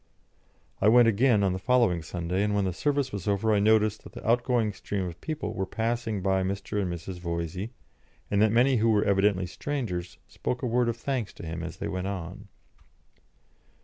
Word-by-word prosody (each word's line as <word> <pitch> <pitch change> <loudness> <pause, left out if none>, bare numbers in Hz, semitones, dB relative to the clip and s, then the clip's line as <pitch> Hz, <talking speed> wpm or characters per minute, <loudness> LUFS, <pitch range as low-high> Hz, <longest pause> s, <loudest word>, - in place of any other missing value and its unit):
I - - +4
went 120 +1 +7
again 115 -1 +3
on 95 -2 +2
the 95 - -3
following 115 -6 +2
Sunday, 90 +3 -2
and 105 0 +1
when 100 -1 +1
the 95 - -1
service 140 - 0
was 100 -2 -5
over 105 +2 +2
I 105 - +3
noticed 110 0 +3
that - - -12
the - - -8
outgoing 120 -2 +2
stream 95 0 -3
of 85 -2 -7
people 150 -9 -4
were 95 -1 -2
passing 115 -2 -2
by 95 0 +2
Mr. 100 +2 -2
and 90 -3 -2
Mrs. 85 +2 -6
Voysey, 85 +3 -3 0.6
and 100 0 +3
that 110 -1 +4
many 125 +3 +4
who 115 +1 +3
were 105 -2 +3
evidently 100 -1 +2
strangers 90 -5 -4
spoke 125 +1 -4
a - - +1
word 120 0 +2
of 115 - -2
thanks 120 -3 -3
to - - -10
him 80 +1 -4
as 85 -1 -6
they - - -4
went 95 0 -3
on. 90 -3 -6
105 Hz, 200 wpm, -27 LUFS, 95-115 Hz, 0.6 s, went